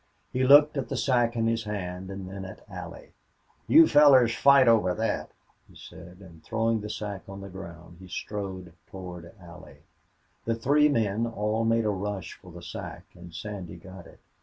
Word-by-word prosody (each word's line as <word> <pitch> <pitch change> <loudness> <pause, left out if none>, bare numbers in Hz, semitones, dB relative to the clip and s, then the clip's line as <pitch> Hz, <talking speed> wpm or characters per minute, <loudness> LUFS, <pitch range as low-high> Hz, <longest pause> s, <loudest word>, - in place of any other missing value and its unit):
He 130 - 0
looked 145 +3 +6
at 135 - -3
the - - -3
sack 120 -3 +1
in 115 -1 0
his 115 0 -1
hand 95 -3 -5
and 95 -1 -7
then 95 +1 -7
at 95 - -11
Allie. - - -10 0.5
"You 325 +1 +7
fellers 135 -5 +6
fight 140 -2 +5
over 105 -6 +3
thet," 110 +1 -2 0.4
he - - -19
said, 90 +1 -13
and, 85 -4 -15
throwing 115 -1 -1
the 105 - -7
sack 105 -2 -5
on 100 0 -8
the 100 - -9
ground, 85 -2 -11
he 95 - -12
strode 95 -2 -6
toward 90 -3 -9
Allie. 90 0 -14 0.6
The 115 - 0
three 145 +6 +3
men 115 -3 0
all 110 0 -2
made 115 0 +2
a 105 - +1
rush 100 -3 -5
for - - -15
the - - -11
sack - - -8
and 85 0 -13
Sandy 95 0 -7
got 95 +1 -12
it. - - -18
105 Hz, 185 wpm, -27 LUFS, 95-115 Hz, 0.6 s, You